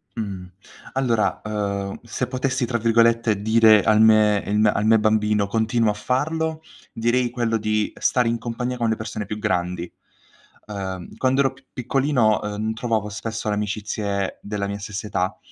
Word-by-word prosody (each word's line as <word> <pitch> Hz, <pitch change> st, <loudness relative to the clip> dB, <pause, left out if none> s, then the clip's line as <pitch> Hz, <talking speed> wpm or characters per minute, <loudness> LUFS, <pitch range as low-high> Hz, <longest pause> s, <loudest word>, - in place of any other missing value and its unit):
Mh. 100 Hz, -5 st, -5 dB, 0.5 s
Allora, 120 Hz, -5 st, +1 dB
uhm, 100 Hz, -2 st, -3 dB
se 120 Hz, +2 st, -3 dB
potessi, 130 Hz, 0 st, -1 dB
tra 120 Hz, 0 st, -1 dB
virgolette, 115 Hz, -2 st, +2 dB
"dire 110 Hz, -1 st, +5 dB
al 110 Hz, 0 st, +4 dB
me 110 Hz, -2 st, +5 dB
ehm, 105 Hz, +1 st, +2 dB
al 105 Hz, -, -1 dB
me 110 Hz, 0 st, +5 dB
bambino:" 105 Hz, -1 st, +2 dB
"Continuo 110 Hz, +1 st, +1 dB
a -, -, -3 dB
farlo," 160 Hz, +8 st, -1 dB, 0.3 s
direi 120 Hz, +2 st, +1 dB
quello 120 Hz, -2 st, -1 dB
di 110 Hz, 0 st, -1 dB
stare 125 Hz, -2 st, +2 dB
in 115 Hz, 0 st, 0 dB
compagnia 125 Hz, +2 st, -3 dB
con 115 Hz, -2 st, 0 dB
le 110 Hz, -, +1 dB
persone 110 Hz, -1 st, -5 dB
più 105 Hz, +2 st, -5 dB
grandi. 90 Hz, -3 st, -2 dB, 0.7 s
Uhm, 95 Hz, -4 st, -6 dB
quando 130 Hz, +1 st, +2 dB
ero 135 Hz, -2 st, +1 dB
p -, -, -21 dB
piccolino, 125 Hz, -3 st, +1 dB
uhm, 105 Hz, +1 st, -3 dB
n -, -, -3 dB
trovavo 110 Hz, -2 st, -1 dB
spesso 110 Hz, +1 st, -4 dB
le 105 Hz, -, 0 dB
amicizie 105 Hz, -1 st, -3 dB
della 100 Hz, -1 st, -3 dB
mia 100 Hz, 0 st, -4 dB
stessa 105 Hz, +1 st, -6 dB
età, 95 Hz, -1 st, -2 dB
110 Hz, 165 wpm, -22 LUFS, 105-120 Hz, 0.7 s, dire